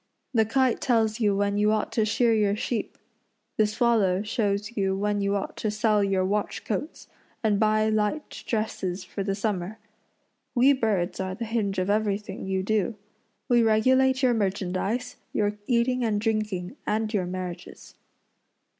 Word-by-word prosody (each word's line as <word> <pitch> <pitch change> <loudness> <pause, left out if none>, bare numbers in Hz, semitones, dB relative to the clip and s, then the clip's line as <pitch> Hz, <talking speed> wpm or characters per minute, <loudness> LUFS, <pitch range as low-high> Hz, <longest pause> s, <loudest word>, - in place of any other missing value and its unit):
The 220 -2 +4
kite 255 +2 +1
tells 225 -3 +1
you 205 -3 +2
when 200 0 0
you 210 +1 +3
ought 215 -1 0
to 220 - +1
shear 230 +2 +2
your 205 -2 +2
sheep; 220 +1 -3 0.6
the 215 - +4
swallow 210 -4 +2
shows 210 0 -1
you 195 -2 0
when 205 0 0
you 200 0 +1
ought 200 - -3
to 215 - -1
sell 210 -1 +2
your 195 -1 +1
watch 205 +2 -2
coats, 230 - -4 0.4
and 210 -2 +2
buy 215 0 +3
light 215 +7 -1
dresses 195 -5 -2
for 185 +2 -6
the 195 0 -1
summer. 200 -1 -2 0.8
We 260 +3 +6
birds 210 -9 0
are 185 -1 -3
the 230 - -4
hinge 215 -3 -1
of 185 +2 +1
everything 210 -2 -1
you 190 -1 -1
do. 215 +1 0 0.5
We 240 -1 +4
regulate 260 +4 +3
your 250 -1 +4
merchandise, 200 +3 -2 0.2
your 210 0 0
eating 250 +1 +2
and 215 -3 +1
drinking, 215 -1 -2
and 215 +1 0
your 185 -4 0
marriages." 180 -1 -7
210 Hz, 160 wpm, -26 LUFS, 200-225 Hz, 0.8 s, We